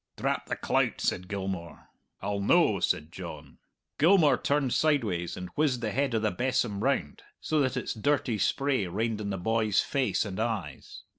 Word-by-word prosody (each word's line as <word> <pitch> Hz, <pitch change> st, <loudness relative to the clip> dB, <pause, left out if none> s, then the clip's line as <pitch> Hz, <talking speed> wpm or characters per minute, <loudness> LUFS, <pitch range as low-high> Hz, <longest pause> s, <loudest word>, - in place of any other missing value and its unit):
"Drap -, -, -1 dB
the -, -, -2 dB
clout," -, -, 0 dB
said 90 Hz, -, -1 dB
Gilmour. 95 Hz, -4 st, -5 dB, 0.4 s
"I'll 100 Hz, 0 st, -1 dB
no," 100 Hz, -, +3 dB
said 75 Hz, +2 st, 0 dB
John. -, -, -9 dB, 0.4 s
Gilmour 160 Hz, -4 st, +5 dB
turned 140 Hz, -3 st, 0 dB
sideways 110 Hz, -, +1 dB
and 90 Hz, -1 st, -6 dB
whizzed 145 Hz, -5 st, 0 dB
the 110 Hz, -2 st, -1 dB
head 135 Hz, -1 st, 0 dB
of 110 Hz, -, 0 dB
the 110 Hz, -, +2 dB
besom 120 Hz, -1 st, -1 dB
round 130 Hz, -, -1 dB, 0.2 s
so 155 Hz, -1 st, 0 dB
that 130 Hz, -2 st, +1 dB
its 125 Hz, -, -2 dB
dirty 120 Hz, -2 st, 0 dB
spray 130 Hz, -1 st, +1 dB
rained 110 Hz, +4 st, -2 dB
in 100 Hz, -, -3 dB
the 95 Hz, -, -2 dB
boy's 110 Hz, +2 st, +1 dB
face 135 Hz, -4 st, 0 dB
and 95 Hz, -1 st, -5 dB
eyes. 105 Hz, -, -4 dB
110 Hz, 170 wpm, -28 LUFS, 95-135 Hz, 0.4 s, Gilmour